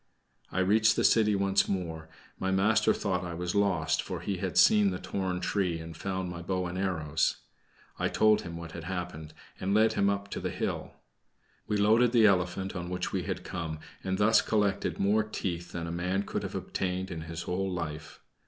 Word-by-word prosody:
I 95 - 0
reached 105 +3 +4
the - - +1
city 105 -2 +4
once 100 0 +2
more; 80 -4 -3 0.3
my 95 - -1
master 95 +4 +3
thought 95 -3 -1
I 85 -1 -5
was 90 +1 -3
lost, 85 -6 +2
for - - -5
he - - -2
had - - -3
seen 105 -2 +6
the 90 - -3
torn 95 -1 -3
tree, 90 -5 0
and 80 0 -8
found 95 +2 -3
my 90 -1 -6
bow 90 +1 -1
and 90 0 -4
arrows. 80 -5 0 0.6
I - - +1
told 110 -1 +4
him 85 -1 -7
what 85 -1 -8
had 85 -1 -8
happened, 90 -4 -5 0.2
and 95 +2 0
led 110 +1 +4
him 100 - +2 0.2
to - - -3
the - - -2
hill. - - -3 0.7
We 105 -1 0
loaded 110 +4 +4
the 115 -3 +6
elephant 95 0 +1
on 90 -1 -4
which 90 0 -3
we - - -2
had - - -3
come, 85 -4 -4 0.3
and 95 0 -1
thus 110 +2 +5
collected 100 -2 0
more 105 +3 +3
teeth 90 -5 -4
than 85 -1 -4
a 85 - -4
man 90 +3 -1
could - - -3
have - - -5
obtained 95 0 -3
in 80 -2 -5
his 85 +1 -6
whole 95 +2 -2
life. 80 -3 -5
95 Hz, 200 wpm, -29 LUFS, 85-100 Hz, 0.7 s, seen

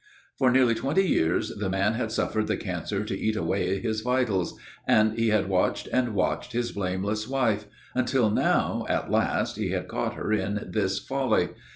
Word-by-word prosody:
For 130 -2 +5
nearly 125 -2 +4
twenty 150 +11 +1
years 80 - +1
the 100 -2 -3
man 95 +3 +1
had 110 -1 -2
suffered 110 -1 0
the - - 0
cancer 95 +2 -3
to 100 - -3
eat 110 +3 -1
away 95 -2 0
his 110 -1 -2
vitals, 120 -7 0 0.3
and 110 0 +4
he 115 0 +1
had 105 -3 +2
watched 95 -1 +1
and 125 -4 +1
watched 100 +5 -1
his 120 0 -1
blameless 100 +3 -2
wife, 120 -6 +1 0.3
until 125 -3 +2
now, - - +1
at - - -1
last, - - +1
he - - -1
had - - -2
caught - - -2
her 110 - -2
in 105 0 -2
this 100 -3 0
folly. 130 -10 0
110 Hz, 180 wpm, -26 LUFS, 100-120 Hz, 0.3 s, For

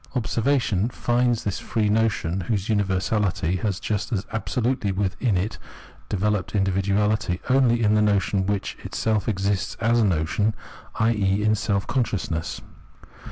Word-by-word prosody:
Observation 115 -3 +1
finds 120 -1 +1
this 100 - -2
free 110 -2 -1
notion, 105 -5 +1
whose 105 -3 -1
universahty 95 -3 0
has 100 -4 -1
just 105 +3 -2
as 105 -3 -1
absolutely 115 -1 -1
within 100 +2 0
it 95 +5 -2 0.5
developed 105 -1 -1
individuahty, 100 0 +1
only 120 -3 +3
in 105 0 +4
the 105 - +4
notion 100 -2 +1
which 100 -1 -2
itself 110 0 -1
exists 100 -1 -1
as 115 +1 +3
notion, 100 +3 +1 0.4
i.e. 105 -3 +1
in 110 0 +3
self 100 -2 0
consciousness. 100 -9 -2
105 Hz, 125 wpm, -24 LUFS, 95-110 Hz, 0.5 s, in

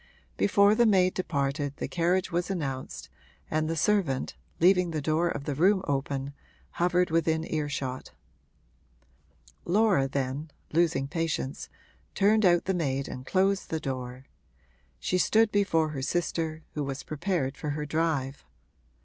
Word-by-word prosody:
Before 200 +1 +4
the 235 +1 +4
maid 185 -3 +4
departed 145 -4 -1
the - - -3
carriage 180 +2 0
was 175 +2 -1
announced, 135 -8 -4 0.4
and 155 0 0
the 165 - -1
servant, 165 -6 0 0.2
leaving 180 0 +4
the 160 -2 -2
door 155 +4 +1
of 145 - -4
the 145 0 -2
room 190 +6 +3
open, 140 0 -2 0.4
hovered 180 0 +1
within 160 -1 +1
earshot. 140 -4 -3 1.5
Laura 190 -7 +3
then, 140 +3 -3 0.2
losing 160 -5 +2
patience, 160 -3 -3 0.5
turned 215 +2 +4
out 175 -1 +4
the 190 - 0
maid 140 -6 -1
and 130 +1 -8
closed 195 +1 +1
the 160 - -1
door; 130 -2 -5 0.7
she 180 - 0
stood 220 +4 +3
before 175 -7 +2
her 145 -3 -5
sister, 160 +1 -2
who 150 - -2
was 135 0 -4
prepared 155 -4 -2
for 150 - -5
her 150 +1 -3
drive. 150 -3 -1
160 Hz, 140 wpm, -28 LUFS, 140-180 Hz, 1.5 s, Before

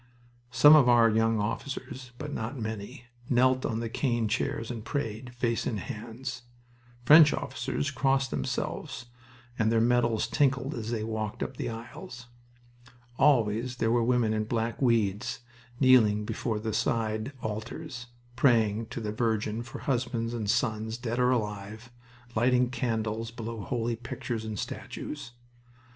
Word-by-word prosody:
Some 135 +6 +8
of 135 -5 +6
our 115 -2 +6
young 115 0 +2
officers, 125 +3 -4
but 150 +1 -6
not 115 +5 -4
many, 110 +1 -6 0.2
knelt 130 +1 +3
on 115 0 -2
the 115 - -2
cane 120 -1 0
chairs 115 +2 -2
and 115 -3 -6
prayed, 125 -3 -4
face 120 -1 0
in 110 - -1
hands. 125 +3 -6 0.6
French 150 +3 +8
officers 135 +3 -3
crossed 135 -1 +1
themselves 130 0 -3 0.5
and 110 0 +3
their 115 - +3
medals 120 -1 +2
tinkled 135 -1 +1
as 115 -2 -5
they 115 -2 -2
walked 110 -1 -3
up - - -5
the - - -3
aisles. 115 +1 -8 0.9
Always 120 -3 +3
there 115 -1 +1
were 120 0 +3
women 120 -2 +2
in 110 0 -1
black 115 +2 -2
weeds 115 -2 +1 0.4
kneeling 110 -6 +5
before 110 0 -2
the 110 0 -3
side 110 +4 -1
altars, 120 +5 -5 0.3
praying 115 -4 +3
to 120 - -6
the 105 -1 -3
Virgin 110 0 -1
for 120 0 -8
husbands 120 -3 -1
and 110 -4 -3
sons, 110 0 0
dead 120 0 -3
or 125 0 +4
alive, 110 -1 -3 0.4
lighting 125 +2 +3
candles 115 -3 -2
below 115 -1 -6
holy 120 +1 -2
pictures 115 -1 -5
and 110 -1 -4
statues. 145 +5 -6
115 Hz, 145 wpm, -28 LUFS, 110-125 Hz, 0.9 s, Some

